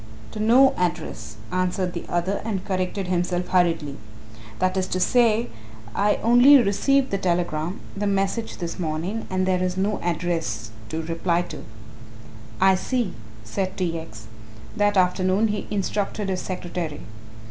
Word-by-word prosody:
"To 215 Hz, -, -7 dB
no 245 Hz, +5 st, +6 dB
address," 140 Hz, -11 st, -3 dB, 0.2 s
answered 185 Hz, 0 st, 0 dB
the 170 Hz, -, -5 dB
other 175 Hz, +3 st, -1 dB
and 200 Hz, -4 st, -3 dB
corrected 185 Hz, +1 st, -2 dB
himself 180 Hz, 0 st, -1 dB
hurriedly; 165 Hz, -6 st, +1 dB, 0.6 s
"that 185 Hz, 0 st, +1 dB
is 185 Hz, -1 st, 0 dB
to 185 Hz, -, -2 dB
say 230 Hz, +2 st, +3 dB, 0.4 s
I 205 Hz, +1 st, +2 dB
only 245 Hz, +5 st, +8 dB
received 260 Hz, +5 st, +2 dB
the 195 Hz, -, 0 dB
telegram 175 Hz, -1 st, -1 dB, 0.2 s
the 205 Hz, +1 st, -1 dB
message 195 Hz, +3 st, -1 dB
this 170 Hz, +1 st, -5 dB
morning 175 Hz, +7 st, -3 dB
and 185 Hz, 0 st, 0 dB
there 185 Hz, -1 st, +1 dB
is 185 Hz, 0 st, -1 dB
no 200 Hz, +2 st, 0 dB
address 165 Hz, -11 st, -2 dB, 0.2 s
to 160 Hz, +1 st, -3 dB
reply 170 Hz, +1 st, 0 dB
to." -, -, -9 dB, 0.9 s
"I 190 Hz, 0 st, +6 dB
see," 230 Hz, +2 st, -1 dB, 0.3 s
said 185 Hz, -, -3 dB
T. 170 Hz, -3 st, -1 dB
X. 110 Hz, -8 st, -11 dB, 0.5 s
That 205 Hz, -1 st, +2 dB
afternoon 185 Hz, +3 st, +2 dB
he 210 Hz, 0 st, -3 dB
instructed 205 Hz, 0 st, -2 dB
his 185 Hz, -1 st, -1 dB
secretary. 175 Hz, -4 st, -4 dB
185 Hz, 145 wpm, -24 LUFS, 175-205 Hz, 0.9 s, only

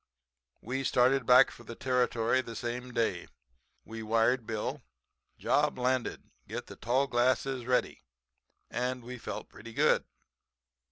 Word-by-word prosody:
"We 130 Hz, +4 st, -3 dB
started 130 Hz, 0 st, +3 dB
back 125 Hz, 0 st, +7 dB
for 120 Hz, -, -13 dB
the 115 Hz, 0 st, -8 dB
Territory 125 Hz, -1 st, +1 dB
the 115 Hz, -2 st, -9 dB
same 125 Hz, +2 st, -4 dB
day. 115 Hz, -1 st, -1 dB, 0.6 s
We 115 Hz, 0 st, -7 dB
wired 115 Hz, +2 st, +2 dB
Bill: 110 Hz, -2 st, -3 dB, 0.6 s
'Job -, -, +1 dB
landed; 125 Hz, 0 st, -1 dB, 0.2 s
get -, -, -5 dB
the -, -, -11 dB
tall 130 Hz, +4 st, +1 dB
glasses 130 Hz, 0 st, +1 dB
ready,' 125 Hz, -1 st, 0 dB, 0.7 s
and 125 Hz, 0 st, -2 dB
we 125 Hz, +1 st, -8 dB
felt -, -, -6 dB
pretty 115 Hz, +1 st, -12 dB
good. -, -, +3 dB
125 Hz, 130 wpm, -30 LUFS, 115-130 Hz, 0.7 s, back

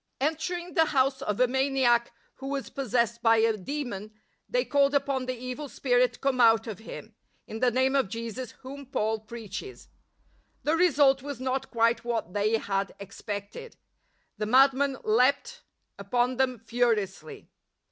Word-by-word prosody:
Entering 345 Hz, +5 st, -2 dB
the 325 Hz, -3 st, +4 dB
house 270 Hz, -2 st, +1 dB
of 210 Hz, -5 st, -2 dB
a 255 Hz, -, +6 dB
maniac 265 Hz, -2 st, +2 dB, 0.3 s
who 270 Hz, -, -7 dB
was 275 Hz, -1 st, -4 dB
possessed 235 Hz, -3 st, 0 dB
by 225 Hz, -1 st, +5 dB
a 225 Hz, 0 st, +3 dB
demon, 215 Hz, -2 st, -5 dB, 0.4 s
they -, -, +1 dB
called 280 Hz, 0 st, +2 dB
upon 275 Hz, -2 st, 0 dB
the 255 Hz, -1 st, -3 dB
evil 255 Hz, +4 st, -6 dB
spirit 245 Hz, -2 st, +2 dB
to -, -, -15 dB
come 265 Hz, -2 st, +1 dB
out 225 Hz, -1 st, +5 dB
of 220 Hz, -5 st, -6 dB
him 220 Hz, 0 st, -10 dB
— -, -, -43 dB
" -, -, -42 dB
in 220 Hz, -, -6 dB
the 250 Hz, +1 st, +3 dB
name 260 Hz, +3 st, +1 dB
of 265 Hz, -8 st, +2 dB
Jesus 230 Hz, +2 st, -6 dB
whom 275 Hz, +1 st, -9 dB
Paul 220 Hz, -3 st, -1 dB
preaches." 220 Hz, -, -9 dB, 0.7 s
The 305 Hz, +2 st, +2 dB
result 285 Hz, -6 st, +4 dB
was 285 Hz, -2 st, -6 dB
not 260 Hz, +1 st, -2 dB
quite 230 Hz, 0 st, +2 dB
what 230 Hz, -7 st, -3 dB
they 210 Hz, +2 st, +2 dB
had 195 Hz, -2 st, -2 dB
expected. 205 Hz, -, -7 dB, 0.6 s
The 210 Hz, -, -1 dB
madman 270 Hz, +2 st, +4 dB
leaped 255 Hz, -, +2 dB, 0.4 s
upon 245 Hz, +5 st, 0 dB
them 255 Hz, -1 st, +1 dB
furiously. 230 Hz, -, -2 dB
250 Hz, 160 wpm, -27 LUFS, 225-275 Hz, 0.7 s, a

